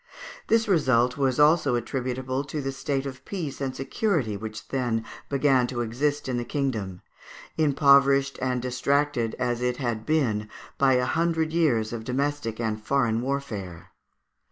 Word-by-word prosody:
This 225 0 +3
result 130 - +3
was 135 -2 0
also 150 -3 +4
attributable 130 +2 -2
to 145 +2 -4
the 135 -1 -2
state 135 0 -2
of 130 -2 -7
peace 160 -9 -5
and 135 -1 -2
security 135 - -1
which 110 +1 -7
then 120 -4 -1 0.2
began 135 -3 +3
to 120 -1 -3
exist 145 +6 -1
in 125 -2 -1
the 120 - -1
kingdom, 110 -10 -3 0.5
impoverished 140 -2 +4
and 125 -1 -1
distracted 130 -1 0
as 120 -1 -1
it 125 0 0
had 120 -5 -2
been 110 -8 0 0.3
by 135 -1 +5
a 125 0 +2
hundred 160 +1 0
years 120 -10 +2
of 115 -1 -5
domestic 130 -2 -2
and 110 -2 -2
foreign 120 -3 +1
warfare. 110 -11 -4
130 Hz, 150 wpm, -26 LUFS, 120-140 Hz, 0.5 s, by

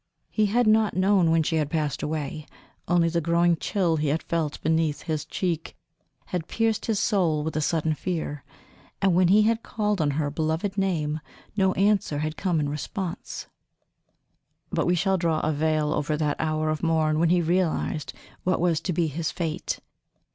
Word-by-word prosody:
He 215 -1 +2
had 240 +4 +2
not 215 0 +3
known 185 -2 +3
when 165 0 +3
she 160 +1 0
had 150 -2 0
passed 150 -2 -1
away 150 -1 -4 0.4
only 170 0 +3
the 170 0 0
growing 170 +1 +3
chill 170 -2 0
he 150 0 0
had 150 +3 0
felt 160 -3 -2
beneath 160 -1 +1
his 155 -3 -2
cheek 170 -4 -3 0.6
had 175 -3 -2
pierced 225 -1 0
his 220 -3 +1
soul 170 -10 +1
with 160 0 -3
a 155 - +1
sudden 160 0 +1
fear, 155 -4 -4 0.6
and 195 -2 +3
when 180 +1 +4
he 205 +4 +5
had 225 +1 +2
called 210 -5 -1
on 150 - +2
her 145 -2 0
beloved 160 +6 -1
name 160 -6 0 0.4
no 190 -2 +3
answer 195 -6 +2
had 155 +1 -2
come 175 -1 0
in 145 - 0
response. 170 +5 -5 1.3
But - - 0
we 175 - +3
shall 190 +2 +1
draw 165 -2 +1
a 155 - +1
veil 155 0 +1
over 150 +1 -1
that 150 -1 0
hour 155 0 0
of 155 - -3
morn 160 -2 +2
when 165 0 +3
he 180 +1 +4
realized 160 -5 0 0.3
what 185 0 +1
was 170 -2 +2
to 180 - -2
be 170 +1 +1
his 160 +1 -2
fate. 165 -3 -3
165 Hz, 185 wpm, -25 LUFS, 155-185 Hz, 1.3 s, he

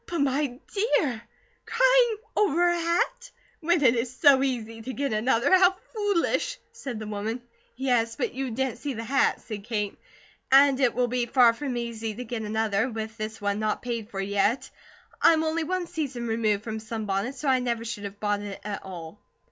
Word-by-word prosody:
"But, 345 - -3
my 280 +1 +2
dear! 265 - -1 0.5
Crying - - +4 0.2
over 350 -3 +3
a 345 - +2
hat? 350 +9 0 0.3
When 340 -2 +2
it 235 -3 +6
is 235 +1 -1
so 280 -3 +6
easy 230 -4 -2
to 260 +3 -6
get 275 -2 -1
another? 230 +8 +3
How 370 0 +5 0.2
foolish!" 415 +4 0
said 250 -5 -6
the 215 - -6
woman. 210 +3 -3 0.4
"Yes, 240 -3 +1
but - - -2
you 265 +1 -3
didn't 250 0 -2
see 280 -1 -4
the 225 - -4
hat," 275 +4 +2
said 210 -3 -7
Kate. 210 -3 -3 0.5
"And 275 0 +6
it 255 -3 +2
will 250 0 +2
be 240 0 -1
far 240 -1 +5
from 260 0 -4
easy 225 -2 -4
to 250 - -5
get 230 -1 -4
another, 220 +1 0
with 220 -1 -5
this 215 +1 -5
one 205 0 -1
not 215 0 -1
paid 235 -3 -4
for 195 - -6
yet. 200 +5 0 0.5
I'm 320 -1 +5
only 320 +1 0
one 365 +2 -1
season 285 -8 -4
removed 220 -2 0
from 220 -1 -4
sunbonnets, 220 +2 -3
so 295 - -4
I 260 -1 +4
never 235 -2 -2
should 210 -3 -5
have 200 0 -8
bought 205 -1 0
it 205 -1 -6
at 205 0 -4
all." 175 0 -9
240 Hz, 190 wpm, -26 LUFS, 220-285 Hz, 0.5 s, it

